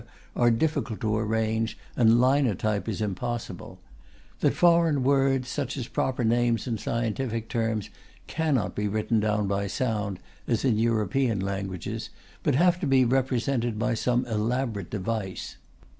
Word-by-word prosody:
are 120 - +4
difficult 120 -2 0
to 110 -3 0
arrange 110 +1 0 0.2
and 115 -1 +5
linotype 120 -6 +2
is 110 0 -3
impossible; 115 +4 -4 0.6
that - - +2
foreign 170 -5 +4
words, 135 -1 +2
such 140 0 -3
as 125 -3 -4
proper 130 -2 -1
names 120 0 +2
and 115 -4 -2
scientific 115 0 -2
terms, 110 -3 -2 0.3
cannot 155 -8 0
be 105 0 -1
written 110 +2 0
down 105 -1 +1
by 100 0 -1
sound, 105 -3 -2 0.3
as 115 +2 0
in 115 -5 +2
European 115 +1 +1
languages, 100 +3 -4 0.3
but 145 - +1
have 175 +4 +4
to 170 - -2
be 135 -2 +4
represented 125 -2 0
by 120 +2 0
some 120 +2 +1
elaborate 110 -2 -2
device. 105 -1 -4
115 Hz, 140 wpm, -26 LUFS, 110-130 Hz, 0.6 s, and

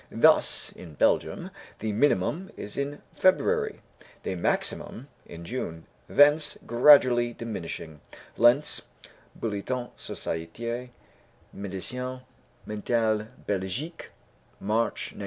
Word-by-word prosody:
Thus, - - +4
in 80 -4 -12
Belgium, - - +1 0.3
the 110 0 -2
minimum 145 - +1
is 105 - -7
in 140 +1 -3
February; 440 - +2 0.4
the - - -2
maximum 115 +8 -2 0.2
in 85 0 -9
June, 85 -8 -5 0.2
thence 150 +2 +5
gradually 120 -1 +6
diminishing 85 -9 -6 0.3
(Lentz, 120 +6 +4 0.5
Bulletin 115 +3 -3
Société 115 +10 -4 0.7
Médecine 125 +7 -5 0.4
Mentale 110 0 0 0.2
Belgique, 105 - -3 0.5
March, 110 +3 -1
1901). - - -12
115 Hz, 90 wpm, -27 LUFS, 100-135 Hz, 0.7 s, gradually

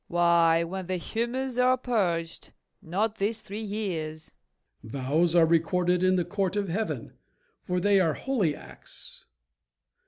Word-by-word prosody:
FAULKNER. - - -9
Why, 170 -1 +4
when 185 +2 -5
the 185 - -1
humors 240 +6 -3
are 255 +1 +4
purged, 180 -10 -2 0.3
not 210 +6 -1
this 210 +3 -1
three 205 +3 -7
years. 175 -8 -4 0.5
MORE. 110 - -11
Vows 160 +6 +2
are 170 -1 +7
recorded 175 +2 +2
in 185 0 +4
the 175 -2 +1
court 195 +1 -1
of 200 -2 -1
Heaven, 215 +6 -3 0.5
For 180 0 -1
they 200 +2 +4
are 165 -5 +2
holy 210 - 0
acts. - - -9
180 Hz, 150 wpm, -27 LUFS, 165-210 Hz, 0.5 s, are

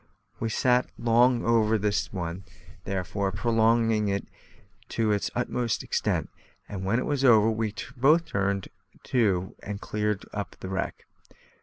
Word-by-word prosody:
We 115 - -1
sat 125 +3 +2
long 120 +1 +3
over 110 -1 +3
this 105 0 -1
one, 90 -1 -4 0.4
therefore, 95 +1 -2
prolonging 115 +1 +2
it 100 0 -2 0.6
to 110 -2 +1
its 105 -1 0
utmost 120 -1 -1
extent; - - -1 0.4
and 95 -2 -6
when 100 +5 +1
it 125 - -1
was 145 -2 -1
over, 115 -4 +6
we 110 -1 -2 0.2
both 150 +7 +4
turned 100 - -1 0.3
to 95 -7 +1
and 100 -1 -5
cleared 105 -1 -2
up 100 -1 -5
the 95 - -6
wreck. 95 0 -3
110 Hz, 140 wpm, -27 LUFS, 100-115 Hz, 0.6 s, over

